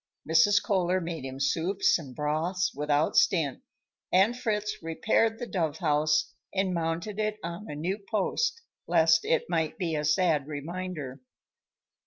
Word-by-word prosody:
Mrs. 165 +6 +4
Kohler 185 -2 +1
made 165 -5 -5
him 135 0 -7
soups 170 +8 +2
and 135 -6 -10
broths 160 +5 -1
without 150 +1 0
stint, 160 -9 +2 0.5
and 195 +6 +4
Fritz 210 -4 -2
repaired 220 +7 +1
the 240 - -5
dove 160 -8 -2
house 150 -2 +1 0.2
and 190 -1 0
mounted 170 +5 -2
it 215 0 -1
on 170 +5 -6
a 150 - -5
new 180 +7 -2
post, 460 - 0 0.2
lest 160 0 +4
it 160 - +1
might 165 -3 -1
be 175 -4 -2
a 150 -1 -1
sad 155 -2 +2
reminder. 155 -3 -6
170 Hz, 145 wpm, -28 LUFS, 150-195 Hz, 0.5 s, Mrs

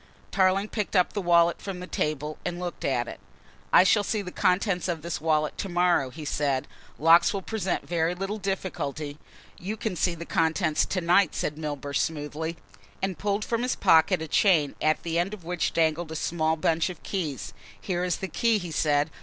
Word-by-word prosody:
Tarling 195 +1 +2
picked 210 -2 -3
up 180 -1 +3
the 205 - -2
wallet 170 -1 +3
from 195 -2 -5
the 180 - -6
table 150 -3 -3
and 175 0 -3
looked 180 -1 -5
at 120 -3 0
it. - - -8 0.5
"I - - +8
shall 205 +2 +4
see 210 0 -1
the 180 - -7
contents 180 0 +1
of 165 -4 -3
this 170 -3 -4
wallet 155 -1 0
to 195 - -3
morrow," 175 -6 +2
he 150 +4 -9
said. 140 -3 0 0.3
"Locks 170 +5 +5
will 195 - -3
present 195 -4 -2
very 170 0 0
little 195 +4 -4
difficulty 155 -7 -4 0.2
" - - -23
"You 205 +5 -4
can 215 -3 -3
read 170 -1 -3
the 170 - -7
contents 160 -1 +1
to 185 - -1
night," 175 +1 +3
said 150 - -2
Milburgh 145 -2 -3
smoothly, 160 +1 -3 0.4
and 190 -2 -3
pulled 205 +1 -1
from 230 0 -1
his 250 +1 0
pocket 160 +1 +4
a - - -5
chain, 155 -5 +3
at 155 0 +1
the 170 0 0
end 195 +5 -1
of 190 - -17
which 175 0 -1
dangled 160 0 0
a - - -5
small 160 0 0
bunch 160 +2 +1
of 180 - -9
keys. 150 - -4 0.3
"Here 180 -1 -2
is 180 -2 0
the 190 - -4
key," 230 +3 +2
he 175 -4 -6
said. 150 0 +1
170 Hz, 205 wpm, -26 LUFS, 155-190 Hz, 0.5 s, I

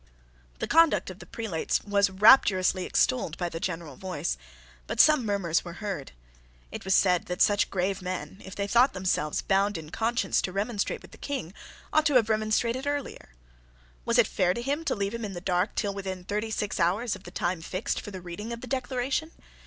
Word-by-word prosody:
The - - -2
conduct 330 - +4
of 185 - -12
the - - -12
prelates 215 -8 -2
was 200 -1 +2
rapturously 190 -3 +5
extolled 150 +5 +1
by 175 -1 -2
the 165 - -5
general 165 -4 -4
voice: 180 - -3 0.5
but - - -4
some 305 -4 +6
murmurs 195 -6 0
were 175 - -8
heard. 195 -7 -5 0.6
It - - -7
was 190 0 +2
said 180 -3 +3
that 180 0 -4
such 205 -1 +3
grave 190 0 -1
men, 185 +2 -5
if 190 - -9
they 200 - -1
thought 240 +6 +4
themselves 180 -5 -1
bound 200 +1 +2
in 155 -1 -9
conscience 235 +2 +1
to 185 - -3
remonstrate 200 +2 -2
with - - -14
the - - -15
King, 265 - -4 0.4
ought 310 +1 +4
to 290 - +1
have 225 -3 +4
remonstrated 225 +4 0
earlier. 285 - -4 0.7
Was - - +1
it - - +6
fair 180 0 +1
to 235 - -3
him 285 +5 -1
to - - 0
leave 200 +1 -2
him 235 0 -4
in 205 -2 -4
the 175 - -5
dark 180 +2 0
till 205 -2 -1
within 190 -2 -5
thirty 210 +4 -2
six 210 -2 -2
hours 200 +7 +1
of - - -12
the 175 - -10
time 175 -1 -2
fixed 185 +4 -3
for - - -8
the 190 -2 -8
reading 180 +6 -7
of 235 0 -5
the - - -6
Declaration? 260 +4 -1
200 Hz, 205 wpm, -27 LUFS, 180-230 Hz, 0.7 s, some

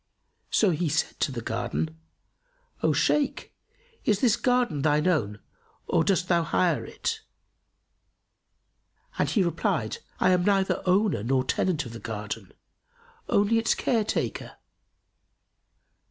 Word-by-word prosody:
So 205 -4 +3
he 165 0 -1
said 160 +3 -1
to - - +1
the 120 -3 -5
Gardener, 140 +9 -2 0.9
"O - - +3
Shaykh, 290 -2 0 0.5
is 210 -3 +2
this 235 -2 +4
garden 245 - +1
thine 150 +1 +2
own 110 - +1 0.5
or - - +2
dost 185 -2 +1
thou 175 -2 +3
hire 170 +1 +1
it?"; 455 -1 -4 2.0
and - - +2
he 205 - +2
replied, 175 - -1 0.2
"I - - +4
am 180 -1 +3
neither 195 0 +2
owner 195 - +2
nor 130 +3 +1
tenant 160 +5 0
of 120 - -8
the 115 - -7
garden, 105 -2 -6 0.8
only 205 +3 +3
its 225 - +1
care 230 -3 +1
taker." 220 - -3
175 Hz, 125 wpm, -26 LUFS, 135-210 Hz, 2.0 s, this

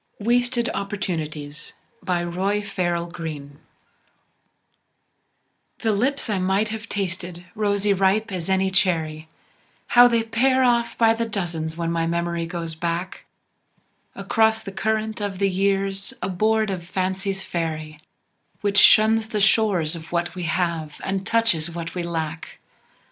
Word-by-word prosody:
WASTED 240 +2 +2
OPPORTUNITIES 160 -7 -4 0.3
BY 175 -2 -1
ROY 190 +4 -1
FARRELL 175 -4 -1
GREENE 150 -4 -7 2.2
The 225 - +1
lips 255 +8 0
I 205 -4 0
might 190 +3 +1
have 220 +1 -6
tasted, 180 -2 -3
rosy 205 -1 +1
ripe 195 +3 +1
as 180 -2 -4
any 190 0 +2
cherry, 160 -5 0 0.6
How 245 0 +8
they 230 -1 +2
pair 255 +4 +2
off 235 -1 +2
by 225 -1 +5
the 230 0 -2
dozens 170 -5 -3
when 170 -1 -1
my 165 0 0
memory 170 0 -1
goes 165 -1 -5
back 170 +3 -4 0.9
Across 220 -1 +1
the 195 - -6
current 220 +2 -2
of 200 -2 -3
the 195 0 +1
years 195 +1 0
aboard 215 +3 +1
of 180 -3 -4
Fancy's 190 +2 -2
ferry, 155 -3 -4 0.6
Which 205 0 +3
shuns 220 +1 +6
the 215 -2 -2
shores 195 -6 +3
of 160 -1 -10
What 170 -1 -1
We 180 -2 -4
Have 165 -2 -2
and 195 +1 -2
touches 225 -9 +2
What 170 0 -6
We 180 - -3
Lack. 160 -1 -4
190 Hz, 135 wpm, -23 LUFS, 170-215 Hz, 2.2 s, How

